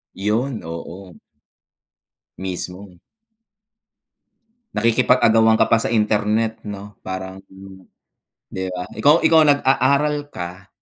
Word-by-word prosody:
'Yon, 110 Hz, +6 st, -2 dB
oo. 85 Hz, +3 st, -9 dB, 1.2 s
Mismo. 90 Hz, 0 st, -6 dB, 1.7 s
Nakikipag-agawan 115 Hz, 0 st, +3 dB
ka -, -, +4 dB
pa 115 Hz, -, +4 dB
sa -, -, -2 dB
internet 110 Hz, 0 st, 0 dB
'no, 105 Hz, 0 st, -8 dB
parang 95 Hz, 0 st, -7 dB, 1.1 s
'di 95 Hz, 0 st, -4 dB
ba? 90 Hz, -, -4 dB
Ikaw 150 Hz, +4 st, +3 dB
ikaw 160 Hz, -1 st, +5 dB
nag-aaral 145 Hz, +1 st, +2 dB
ka, 90 Hz, -5 st, -8 dB
105 Hz, 90 wpm, -20 LUFS, 95-125 Hz, 1.7 s, ikaw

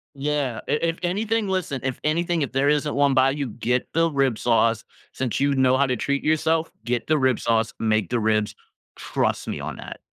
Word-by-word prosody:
Yeah. 140 Hz, -4 st, -1 dB
I -, -, -2 dB
if 165 Hz, +2 st, 0 dB
anything 210 Hz, +4 st, 0 dB
listen, 180 Hz, -9 st, -2 dB
if 130 Hz, -1 st, -3 dB
anything, 170 Hz, +1 st, 0 dB
if -, -, -4 dB
there 135 Hz, +2 st, +2 dB
isn't 150 Hz, 0 st, +1 dB
1 140 Hz, -1 st, +3 dB
by 130 Hz, 0 st, +4 dB
you, 140 Hz, -2 st, -3 dB
get 125 Hz, +3 st, -1 dB
the 165 Hz, 0 st, +3 dB
rib 135 Hz, -5 st, +1 dB
sauce, 115 Hz, -1 st, +2 dB, 0.3 s
since 130 Hz, -3 st, -2 dB
you 140 Hz, 0 st, +2 dB
know 130 Hz, 0 st, +3 dB
how 140 Hz, 0 st, +3 dB
to 125 Hz, -, 0 dB
treat 140 Hz, +4 st, -1 dB
yourself, 160 Hz, +1 st, +1 dB
get 120 Hz, -1 st, -1 dB
the 155 Hz, -1 st, +3 dB
rib 130 Hz, -2 st, +2 dB
sauce, 115 Hz, -1 st, 0 dB
make 110 Hz, -4 st, +1 dB
the 120 Hz, -, 0 dB
ribs. 110 Hz, -1 st, 0 dB, 0.4 s
Trust -, -, -2 dB
me -, -, -3 dB
on -, -, -6 dB
that. -, -, -9 dB
135 Hz, 205 wpm, -23 LUFS, 120-155 Hz, 0.4 s, by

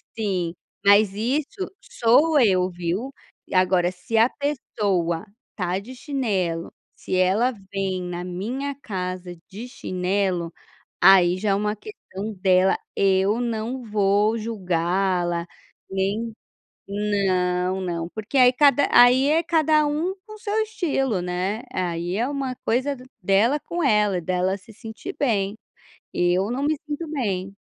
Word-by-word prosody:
Sim, 185 Hz, -6 st, -1 dB, 0.3 s
mas 200 Hz, 0 st, +6 dB
isso 275 Hz, -, -2 dB
sou 290 Hz, +7 st, +3 dB
eu, 185 Hz, -6 st, +3 dB
viu. 180 Hz, +9 st, -3 dB, 0.4 s
Agora, 185 Hz, -1 st, +3 dB
se 185 Hz, +5 st, -3 dB
a 230 Hz, +3 st, +5 dB
pessoa 200 Hz, -, -1 dB, 0.3 s
está 180 Hz, -1 st, -2 dB
de 250 Hz, +6 st, -10 dB
chinelo, 200 Hz, -, -2 dB, 0.2 s
se -, -, -4 dB
ela 195 Hz, +8 st, +3 dB, 0.2 s
vem 190 Hz, -2 st, -2 dB
na 175 Hz, 0 st, -5 dB
minha 235 Hz, +11 st, -4 dB
casa 185 Hz, -3 st, -5 dB
de 220 Hz, +5 st, -8 dB
chinelo, 185 Hz, -6 st, -2 dB, 0.5 s
aí 185 Hz, -2 st, +6 dB
já 205 Hz, +2 st, -1 dB
é -, -, +3 dB
uma 210 Hz, +1 st, -1 dB
questão 215 Hz, -, -8 dB
dela, 185 Hz, 0 st, +4 dB, 0.2 s
eu 195 Hz, +3 st, +2 dB
não 240 Hz, +2 st, -3 dB
vou 210 Hz, 0 st, +2 dB
julgá-la, 180 Hz, -4 st, -1 dB, 0.4 s
nem 200 Hz, +4 st, -1 dB, 0.5 s
Não, 190 Hz, -3 st, 0 dB
não, 170 Hz, -2 st, -3 dB
porque 220 Hz, +5 st, -3 dB
aí 250 Hz, -1 st, +7 dB
cada 285 Hz, +1 st, +4 dB
aí 250 Hz, +3 st, +6 dB
é 320 Hz, +2 st, +3 dB
cada 310 Hz, -2 st, +3 dB
um 315 Hz, +6 st, -1 dB
com 430 Hz, -1 st, -11 dB
seu 425 Hz, 0 st, -3 dB
estilo, 270 Hz, -, -1 dB
né. 185 Hz, +5 st, -2 dB
Aí 175 Hz, -2 st, -2 dB
é 235 Hz, +3 st, +1 dB
uma 270 Hz, -2 st, -3 dB
coisa 260 Hz, +5 st, +1 dB, 0.3 s
dela 210 Hz, +10 st, +3 dB
com 345 Hz, +3 st, -4 dB
ela, 210 Hz, -7 st, +3 dB
dela 185 Hz, +2 st, 0 dB
se 220 Hz, +3 st, -16 dB
sentir 225 Hz, -, -8 dB
bem. 205 Hz, -7 st, +1 dB, 0.6 s
Eu 180 Hz, +4 st, +1 dB
não 260 Hz, +3 st, -2 dB
me 310 Hz, +2 st, +2 dB
sinto 300 Hz, +2 st, -4 dB
bem. 195 Hz, -8 st, -2 dB
205 Hz, 130 wpm, -23 LUFS, 185-250 Hz, 0.6 s, aí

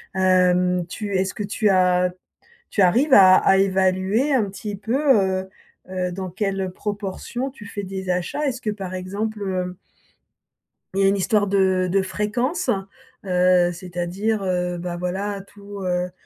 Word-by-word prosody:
Hem, 180 Hz, -1 st, +3 dB
tu 200 Hz, +1 st, -5 dB
est-ce 190 Hz, 0 st, -1 dB
que 210 Hz, -, -4 dB
tu 205 Hz, +1 st, 0 dB
a 180 Hz, -1 st, +3 dB, 0.6 s
tu 200 Hz, -, 0 dB
arrives 255 Hz, -, +4 dB
à 185 Hz, -1 st, +8 dB
à 195 Hz, -, +4 dB
évaluer 190 Hz, +7 st, +2 dB
un 230 Hz, -6 st, +3 dB
petit 200 Hz, +1 st, -6 dB
peu, 225 Hz, +5 st, -2 dB, 0.5 s
heu 190 Hz, -, -12 dB, 0.4 s
heu, 180 Hz, -1 st, -2 dB
dans 185 Hz, 0 st, -5 dB
quelle 195 Hz, -1 st, -2 dB
proportion 210 Hz, +6 st, -4 dB
tu 210 Hz, -6 st, -13 dB
fais 205 Hz, 0 st, -6 dB
des 190 Hz, 0 st, -6 dB
achats? 180 Hz, +12 st, -2 dB
Est-ce 255 Hz, -1 st, -3 dB
que 215 Hz, -, -2 dB
par 195 Hz, -3 st, -5 dB
exemple, 205 Hz, +4 st, -4 dB
heu 185 Hz, -2 st, -3 dB, 1.2 s
il 195 Hz, -, +2 dB
y -, -, +4 dB
a -, -, +6 dB
une 200 Hz, +1 st, +2 dB
histoire 205 Hz, +1 st, +1 dB
de 190 Hz, -2 st, +2 dB
de 195 Hz, 0 st, +3 dB
fréquence? 240 Hz, -, -2 dB, 0.6 s
Heu, 180 Hz, -1 st, +3 dB
c'est-à-dire, 180 Hz, +4 st, -3 dB
heu, 180 Hz, -1 st, -1 dB
bah, 175 Hz, 0 st, -4 dB
voilà, 195 Hz, +3 st, -3 dB
tous, 200 Hz, 0 st, -11 dB
heu, 180 Hz, 0 st, -1 dB
190 Hz, 160 wpm, -22 LUFS, 180-205 Hz, 1.2 s, à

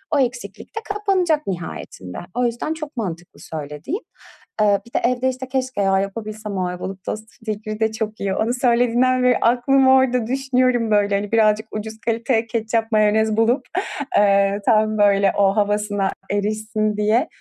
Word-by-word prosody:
o -, -, +3 dB
eksiklik 250 Hz, -, -3 dB
de -, -, -1 dB
kapanacak 370 Hz, -7 st, +1 dB
nihayetinde. 170 Hz, -, -6 dB, 0.2 s
O 245 Hz, 0 st, +1 dB
yüzden 240 Hz, +6 st, -2 dB
çok 305 Hz, -3 st, -8 dB
mantıklı 175 Hz, -6 st, -5 dB
söylediğin. 155 Hz, -, -6 dB, 0.6 s
Eee, 205 Hz, -1 st, +4 dB
bir 235 Hz, -, -18 dB
de -, -, +2 dB
evde, 250 Hz, +1 st, 0 dB
işte, 260 Hz, 0 st, -5 dB
keşke 255 Hz, -4 st, -2 dB
ya 195 Hz, -1 st, +3 dB
yapabilsem. 210 Hz, +1 st, -5 dB
O 185 Hz, -, 0 dB
Ayvalık 185 Hz, +1 st, -6 dB
tostu 215 Hz, +2 st, -5 dB, 0.2 s
fikri 215 Hz, 0 st, -4 dB
de 220 Hz, -1 st, +1 dB
çok 220 Hz, -1 st, -4 dB
iyi. 195 Hz, -1 st, -1 dB
Onu 230 Hz, +2 st, 0 dB
söylediğinden 245 Hz, +1 st, +2 dB
beri 250 Hz, 0 st, +4 dB
aklım 260 Hz, +3 st, +3 dB
orada 260 Hz, -3 st, +4 dB
düşünüyorum, 255 Hz, -3 st, +1 dB
böyle, 205 Hz, -1 st, +3 dB
hani, 200 Hz, 0 st, -2 dB
birazcık 220 Hz, -1 st, +3 dB
ucuz 220 Hz, +1 st, -6 dB
kaliteye 230 Hz, 0 st, 0 dB
ketçap, 225 Hz, 0 st, -1 dB
mayonez 215 Hz, 0 st, +3 dB
bulup, 240 Hz, +4 st, +2 dB, 0.5 s
eee, 200 Hz, 0 st, +3 dB
tam, 215 Hz, -1 st, +3 dB
böyle, 200 Hz, -1 st, +4 dB
o 195 Hz, -1 st, +3 dB
havasına 205 Hz, -1 st, +1 dB, 0.2 s
erişsin 215 Hz, +1 st, -1 dB
diye. 215 Hz, +3 st, +2 dB
220 Hz, 160 wpm, -21 LUFS, 205-250 Hz, 0.6 s, Eee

